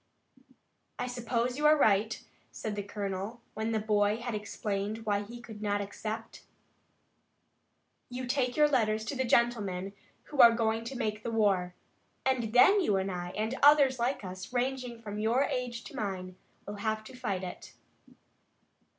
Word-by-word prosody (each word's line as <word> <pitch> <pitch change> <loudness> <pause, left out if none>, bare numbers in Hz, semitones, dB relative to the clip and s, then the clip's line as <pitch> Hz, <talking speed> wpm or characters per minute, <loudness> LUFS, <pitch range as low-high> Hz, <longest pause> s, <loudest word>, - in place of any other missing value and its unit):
"I - - -2
suppose 245 +1 -2
you 300 - +4
are 305 0 +6
right," 215 -3 +2 0.3
said 215 -2 -4
the 205 - -2
colonel, 200 +2 -4
when 220 +1 -2
the 220 - +1
boy 210 0 +2
had 235 0 -4
explained 210 +1 -3
why 205 -1 +1
he 235 +4 -9
could 220 -3 -10
not 205 -1 0
accept. 215 +2 -6 1.7
"You 250 +1 -5
take 250 0 0
your 300 0 +6
letters 220 -6 +1
to 280 - -3
the 260 - 0
gentlemen 205 -6 +1 0.3
who 290 - -8
are 235 -1 +9
going 225 0 0
to 260 +2 -5
make 215 -3 -2
the 235 - -4
war, 195 -5 +1 0.5
and 250 -4 +1
then 390 - +6
you 205 - +2
and 190 0 -1
I 175 -1 -4
and 220 +3 -1
others 280 -3 +6
like 245 0 0
us, 185 +3 -7
ranging 250 -1 -2
from 210 -2 -6
your 230 +5 +2
age 250 -3 -3
to - - -10
mine, 185 -3 -4 0.3
will 205 0 -6
have 215 +1 -2
to 235 - -12
fight 205 -7 -3
it." 180 - -8
220 Hz, 165 wpm, -30 LUFS, 205-245 Hz, 1.7 s, are